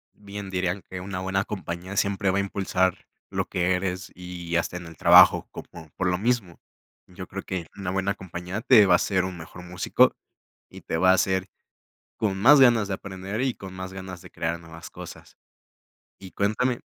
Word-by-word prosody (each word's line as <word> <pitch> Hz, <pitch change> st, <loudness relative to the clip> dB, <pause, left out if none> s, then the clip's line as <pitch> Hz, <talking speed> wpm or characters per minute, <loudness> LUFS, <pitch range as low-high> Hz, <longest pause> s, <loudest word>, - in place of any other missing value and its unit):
Bien 100 Hz, -1 st, -8 dB
dirían 90 Hz, 0 st, -1 dB
que 90 Hz, -1 st, -6 dB
una 95 Hz, 0 st, -5 dB
buena 95 Hz, +1 st, -1 dB
compañía 95 Hz, -1 st, -6 dB
siempre 100 Hz, 0 st, +1 dB
va 95 Hz, -, 0 dB
a -, -, +3 dB
impulsar 95 Hz, -2 st, -1 dB, 0.2 s
lo -, -, -2 dB
que 90 Hz, 0 st, 0 dB
eres 90 Hz, 0 st, -3 dB
y 90 Hz, -1 st, -6 dB
hasta 85 Hz, +1 st, 0 dB
en 90 Hz, -, -9 dB
el 80 Hz, -1 st, -12 dB
trabajo -, -, +7 dB
como 80 Hz, -2 st, -11 dB
por 95 Hz, -, -1 dB
lo 90 Hz, 0 st, +1 dB
mismo. 105 Hz, -5 st, -1 dB, 0.5 s
Yo 90 Hz, 0 st, -9 dB
creo 100 Hz, 0 st, -6 dB
que 90 Hz, -3 st, -4 dB
una 95 Hz, -3 st, -4 dB
buena 95 Hz, +1 st, 0 dB
compañía 90 Hz, +2 st, -6 dB
te 110 Hz, -5 st, +7 dB
va -, -, +4 dB
a -, -, +8 dB
hacer 95 Hz, -2 st, 0 dB
un 95 Hz, -1 st, -5 dB
mejor 90 Hz, +2 st, -10 dB
músico 90 Hz, 0 st, +2 dB, 0.5 s
y -, -, -12 dB
te 80 Hz, -, -3 dB
va 95 Hz, +1 st, +5 dB
a -, -, +6 dB
hacer 95 Hz, 0 st, +1 dB, 0.7 s
con 100 Hz, -3 st, -1 dB
más 135 Hz, +6 st, +7 dB
ganas 120 Hz, -5 st, +5 dB
de 95 Hz, -, -1 dB
aprender 95 Hz, +3 st, -6 dB
y 130 Hz, -2 st, 0 dB
con 95 Hz, -1 st, -10 dB
más 95 Hz, 0 st, -7 dB
ganas 95 Hz, -2 st, -8 dB
de -, -, -13 dB
crear 85 Hz, +1 st, -3 dB
nuevas 80 Hz, 0 st, -11 dB
cosas. -, -, -11 dB, 0.8 s
Y 95 Hz, -1 st, -11 dB
cuéntame, 120 Hz, +5 st, 0 dB
95 Hz, 195 wpm, -25 LUFS, 90-100 Hz, 0.8 s, a